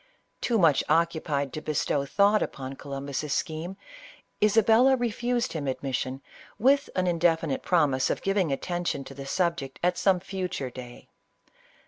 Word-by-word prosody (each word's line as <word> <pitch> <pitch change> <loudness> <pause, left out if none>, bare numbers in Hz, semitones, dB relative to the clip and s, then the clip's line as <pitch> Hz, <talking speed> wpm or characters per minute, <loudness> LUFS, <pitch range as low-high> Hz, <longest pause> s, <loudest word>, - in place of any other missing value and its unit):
Too 235 - +1
much 165 -8 +4
occupied 155 -4 +1
to 155 - -4
bestow 145 -2 -1
thought 205 +6 +3
upon 135 0 -4
Columbus' 140 +1 -4
scheme, 170 +3 -3 0.7
Isabella 225 +5 +5
refused 240 +1 -1
him 150 -4 -3
admission, 130 0 -3 0.3
with 275 +4 +3
an 185 - +1
indefinite 165 -4 +1
promise 145 -7 +2
of - - -2
giving 195 -5 +1
atten 175 +5 -2
tion 140 -5 -2
to 135 - -10
the 135 0 -8
subject 170 -6 -1
at 180 0 +1
some 190 -2 +3
future 180 -8 -4
day. 120 -1 -11
165 Hz, 140 wpm, -27 LUFS, 140-195 Hz, 0.7 s, Isabella